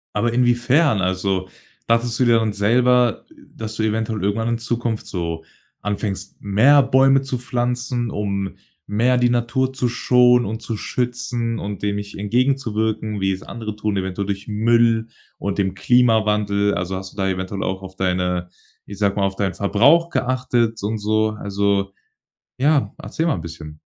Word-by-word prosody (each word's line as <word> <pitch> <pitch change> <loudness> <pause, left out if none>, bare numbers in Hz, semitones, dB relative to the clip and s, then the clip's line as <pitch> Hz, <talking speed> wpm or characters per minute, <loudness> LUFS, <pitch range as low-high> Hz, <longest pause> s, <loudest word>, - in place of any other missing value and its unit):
Aber 115 +3 +1
inwiefern? 125 +2 +3
Also, 95 0 -1 0.4
dachtest 115 0 +1
du 130 - +3
dir 120 -1 +5
dann 110 -2 0
selber, 120 +4 +2 0.3
dass 110 -1 -5
du 110 - -1
eventuell 110 -1 -1
irgendwann 105 +3 0
in 115 -1 0
Zukunft 115 -1 -2
so 85 -3 -4 0.4
anfängst, 100 -1 -3
mehr 120 +9 +5
Bäume 135 +1 +4
zu 135 -2 -3
pflanzen, 120 0 -2
um 100 -2 -3 0.3
mehr 120 +5 +2
die 125 0 +3
Natur 120 +2 0
zu 130 -2 0
schonen 125 0 +4
und 110 +3 -4
zu 115 - -3
schützen 120 0 -2
und 100 -1 -6
dem 100 0 0
nicht 100 0 -7
entgegenzuwirken, 110 -2 0
wie 95 0 +1
es 95 0 -3
andere 110 -2 -6
tun, 105 -1 -2
eventuell 95 +1 -2
durch 100 +1 -4
Müll 115 +1 +2 0.3
und 100 0 -3
dem 95 -2 0
Klimawandel. 105 -2 +2
Also, 90 +1 -3
hast 95 0 -7
du - - -20
da 95 -2 0
eventuell 95 +1 -3
auch 95 0 -3
auf 95 0 -9
deine- 90 -1 -1 0.4
ich 100 - -9
sag 100 -2 +1
mal- 100 - 0
auf 95 0 -4
deinen 95 -2 -1
Verbrauch 140 +12 +3
geachtet 120 -4 0
und 110 +2 -2
so. 110 +1 +1
Also 100 -1 0 0.7
ja, 135 -5 +2
erzähl 135 +10 -3
mal 165 - +2
'n 85 - -5
bisschen. 80 -2 -9
110 Hz, 165 wpm, -21 LUFS, 100-120 Hz, 0.7 s, dir